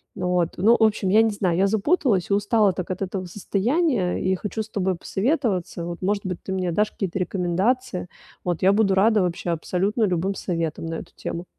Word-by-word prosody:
Ну 180 -2 -2
вот. 175 -2 +1
Ну, 220 +6 +5
в - - +4
общем, 210 -3 +2
я 215 +3 +6
не 225 - +3
знаю. 185 -4 0
Я 195 +1 +3
запуталась 220 - +1
и - - +2
устала 205 -1 +3
так 185 0 -5
от 185 - -4
этого 190 0 -3
состояния 205 - 0
и 190 0 0
хочу 210 +3 -4
с 220 - -15
тобой 190 -3 -1
посоветоваться. 195 - -1
Вот, 175 +1 -6
может 200 +2 -1
быть, 180 -2 -4
ты 190 - -5
мне 180 -2 -1
дашь 210 +5 +1
какие-то 195 -1 -3
рекомендации. 185 +5 -1 0.4
Вот 175 -2 -2
я 190 +2 +5
буду 200 -2 +3
рада 210 +1 +4
вообще 175 -1 -1
абсолютно 190 +7 -1
любым 185 0 +1
советам 165 -4 -3
на 165 - -3
эту - - -8
тему. 170 - -5
190 Hz, 205 wpm, -23 LUFS, 180-215 Hz, 0.4 s, я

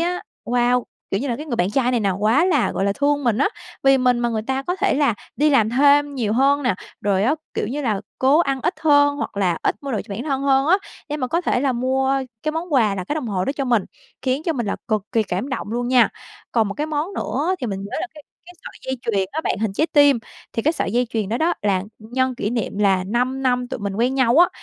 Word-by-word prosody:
á, 355 +1 -1 0.2
wow, 245 +1 +2 0.3
kiểu 195 - 0
như 275 - -3
là, 235 - -1
cái 300 +4 -7
người 245 -6 -2
bạn 180 +2 +1
trai 250 +2 +1
này 245 -2 +1
nè 200 -2 +1
quá 215 - +2
là, 305 -9 +2
gọi 195 - -1
là, 200 - +2
thương 285 +4 0
mình 235 -3 +2
á. 285 - +3 0.3
Vì 270 0 +5
mình 250 -1 +3
mà 240 0 +1
người 220 -2 -2
ta 265 +4 -2
có 355 +6 -2
thể - - +1
là 280 -5 +2 0.2
đi 300 +2 +3
làm 225 -6 +3
thêm 285 +3 +4
nhiều 225 -6 -1
hơn 275 +4 +3
nè, 245 -6 +1 0.3
rồi 195 -1 +1
á, 270 +6 +3 0.2
kiểu - - -1
như 280 +7 -3
là, 215 -6 0 0.2
cố 270 +4 +4
ăn 275 -6 +1
ít - - 0
hơn 285 -2 +4
hoặc 290 - -5
là 180 -4 +1
ít - - +1
mua 280 -1 -4
đồ 220 - 0
cho - - -8
bản 230 - -4
thân 275 -2 -2
hơn 270 0 +3
á, 355 +4 +5 0.3
để 295 - -2
mà 260 -4 -2
có 335 +7 0
thể 315 - 0
là 270 -1 +1
mua 260 +2 +1 0.3
cái 310 - -1
món 325 +1 -4
quà 225 -7 +3
là 185 -2 -4
cái 295 - -3
đồng 305 -5 -3
hồ 185 -3 -1
đó 275 - -1
cho 280 -1 -3
mình, 235 -6 +2 0.4
khiến 260 +3 0
cho 330 - 0
mình 240 -7 -3
là 200 - -1
cực 215 -3 +1
kỳ 225 - +3
cảm 195 +5 -3
động 260 -6 -4
luôn 240 +1 -1
nha. 250 -1 +5 0.4
Còn 225 -3 +2
một 200 - -5
cái 300 - -2
món 310 +4 -2
nữa 310 +8 -1
thì 250 - -2
mình 195 -3 -3
nhớ 200 - -5
là 365 - -2
cái 300 - -12 0.2
cái 355 - -13
sợi - - -10
dây - - -2
chuyền 200 -4 0
đó 315 - -1
bạn, - - 0
hình 215 -2 -1
trái 310 +11 +1
tim. 285 -5 +5 0.3
Thì 230 - -2
cái 310 - +3
sợi 200 - -2
dây 245 +1 +2
chuyền 215 -4 -2
đó 225 - 0
đó 335 +2 +2
là 195 -3 +1 0.2
nhân 255 +4 -1
kỷ 210 -3 -2
niệm 230 -4 -3
là 195 -3 +3
5 250 +6 -1
năm 250 -1 +1
tụi - - -5
mình 200 -1 -3
quen 245 +4 +1
nhau 260 -2 +3
á. 350 0 +7
255 Hz, 280 wpm, -21 LUFS, 220-285 Hz, 0.4 s, á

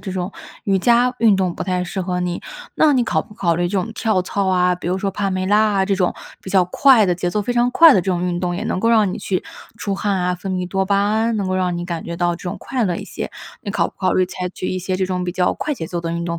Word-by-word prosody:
这 190 - -6
种 185 +1 -3 0.3
瑜 195 -1 +2
伽 240 +5 +3
运 220 -4 +4
动 185 -3 0
不 - - -4
太 180 -1 -1
适 185 +2 -4
合 180 -1 -2
你。 180 0 -2 0.4
那 300 -3 +4
你 245 - +2
考 - - +1
不 210 0 -12
考 170 -6 +1
虑 175 +1 0
这 200 - -2
种 215 +5 -3
跳 215 -6 +1
操 195 +1 -2
啊， 180 -1 +3
比 175 - -6
如 185 - 0
说 195 0 -1
帕 200 +1 -2
梅 185 -1 -1
拉 205 +2 +3 0.2
啊 190 -1 +2
这 195 0 +1
种， 185 -2 0 0.3
比 - - -9
较 190 -1 +4
快 235 +5 +5
的、 180 -2 +1
节 175 0 -2
奏 210 +4 -1
非 245 - -2
常 245 0 +2
快 330 +3 +8
的 195 - +4
这 180 - -10
种 180 0 -1
运 175 -1 -1
动， 175 -1 -1
也 200 - -4
能 - - -1
够 230 - +2
让 215 -5 +3
你 - - -5
去 185 -2 -2 0.3
出 200 -1 -3
汗 200 0 -1
啊、 180 0 0
分 190 +2 -6
泌 180 -1 -2
多 190 +1 -1
巴 200 0 +2
胺， 220 +3 +1
能 200 -2 -1
够 185 - -1
让 180 -2 0
你 175 - -4
感 170 -2 -4
觉 170 - -6
到 175 0 +1
这 170 - -11
种 - - -4
快 255 -4 -2
乐 175 -3 0
一 - - -6
些， - - -6 0.3
你 205 - -5
考 - - +1
不 - - -12
考 185 - +1
虑 185 - +3
采 180 0 -5
取 185 - -6
一 185 - -2
些 185 0 -2
这 190 - 0
种 185 -1 -2
比 175 - -2
较 180 0 +1
快 300 -1 -3
节 160 - -5
奏 175 0 -4
的 165 0 -3
运 170 0 -3
动 170 0 -3
185 Hz, 335 characters per minute, -20 LUFS, 180-205 Hz, 0.4 s, 快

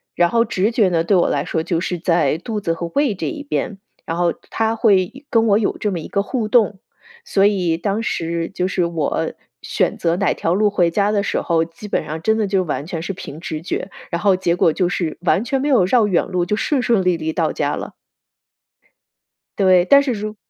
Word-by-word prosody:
然 175 0 +3
后 230 +3 +3
直 210 -1 0
觉 220 -5 +3
呢， 165 -2 +1
对 195 +4 +2
我 175 - +2
来 140 0 -1
说 160 - -1
就 165 0 -1
是 180 -1 -3
在 170 -2 +1
肚 215 +4 -4
子 165 -4 0
和 170 +1 -4
胃 280 -5 +2
这 - - -4
一 300 -4 -5
边， 240 -7 -3 0.3
然 165 - -3
后 175 -1 +1 0.2
它 225 0 0
会 220 +5 +1
跟 225 -1 +3
我 205 -1 +4
有 215 - -1
这 210 - -1
么 175 - -3
一 155 - -7
个 200 - -1
互 230 0 -2
动， 210 -4 +2 0.5
所 195 0 +2
以 185 -5 +2
当 200 +5 -1
时 165 -6 -2
就 180 - -1
是 185 -2 0
我 165 -3 -2 0.3
选 - - -1
择 170 0 0
哪 195 -1 +1
条 165 - -1
路 210 +3 +3
回 180 -4 +2
家 200 +4 +1
的 205 -1 +1
时 200 - -1
候， 165 -1 +1
基 170 +6 -11
本 - - -1
上 160 +1 -5
真 220 +5 +2
的 215 -2 0
就 190 -1 +1
完 150 -3 -3
全 165 -1 -5
是 175 - -4
凭 160 -5 -9
直 155 -3 -5
觉， 180 +2 -4 0.2
然 170 0 -3
后 200 -2 +4
结 175 -2 0
果 170 - +3
就 180 +3 0
是 170 -2 -2
完 185 +3 +2
全 270 +3 -1
没 285 - -1
有 260 -10 +4
绕 220 +2 +3
远 185 -4 +1
路， 180 -2 -1
就 210 - 0
顺 270 +5 0
顺 230 -6 +2
利 180 -2 +2
利 160 0 -3
到 - - 0
家 - - -1
了。 - - -7 1.6
对， 185 -3 +4
但 280 +6 +6
是 275 - -1
如 215 -1 -4
190 Hz, 250 characters per minute, -20 LUFS, 170-215 Hz, 1.6 s, 但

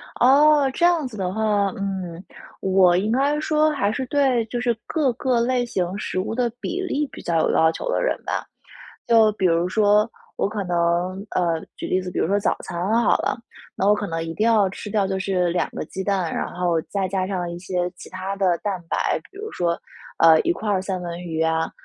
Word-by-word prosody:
哦， 285 +2 +5
这 345 - +2
样 340 -5 +3
子 240 - -10
的 185 -2 -2
话， 210 -1 +1
嗯， 190 -3 -4 0.4
我 185 -2 +4
应 210 +4 0
该 280 +4 +2
说 310 0 +2
还 215 -8 0
是 260 +4 -3
对 265 -4 +2
就 240 +2 -4
是 240 -1 +1
各 290 -6 +1
个 250 0 0
类 245 +1 +1
型 185 -4 -2
食 195 - -3
物 190 - -2
的 245 0 0
比 355 +8 -3
例 300 -5 -1
比 - - -10
较 170 -1 0
有 - - +2
要 160 0 +4
求 - - -5
的 - - 0
人 - - 0
吧。 - - -2 0.6
就 225 -2 +5
比 195 - -1
如 170 0 +2
说 210 +1 +3 0.3
我 - - +1
可 210 -1 -3
能， 175 +2 0
呃， 170 -3 0 0.2
举 - - -5
例 185 - +1
子， 180 0 -6
比 - - -3
如 - - +1
说 200 +3 +2
早 - - +1
餐 175 - -6 0.3
好 - - +4
了。 - - -1 0.4
那 195 - 0
我 210 - +5
可 210 - -3
能 165 -2 -3
一 165 0 -5
定 215 - 0
要 215 -4 +4
吃 195 - -8
掉 200 -2 +1
就 190 0 -2
是 185 -2 0
2 175 - 0
个 - - -5
鸡 190 - -6
蛋， 190 -4 0
然 - - -2
后 175 -2 0
再 195 -2 -2
加 190 0 -1
上 180 -3 -3
一 170 - -6
些 180 0 -2
其 - - -11
他 185 +1 -4
的 185 -3 +2
蛋 195 -3 -3
白， - - +1
比 390 - -14
如 435 +2 -6
说， 170 -1 -1 0.4
呃， 160 -1 +7
1 345 - +1
块 220 -11 -3
儿 195 -2 +1
三 185 -1 -3
文 175 0 -6
鱼 160 -2 -3
啊， 160 0 0
195 Hz, 240 characters per minute, -23 LUFS, 180-240 Hz, 0.6 s, 呃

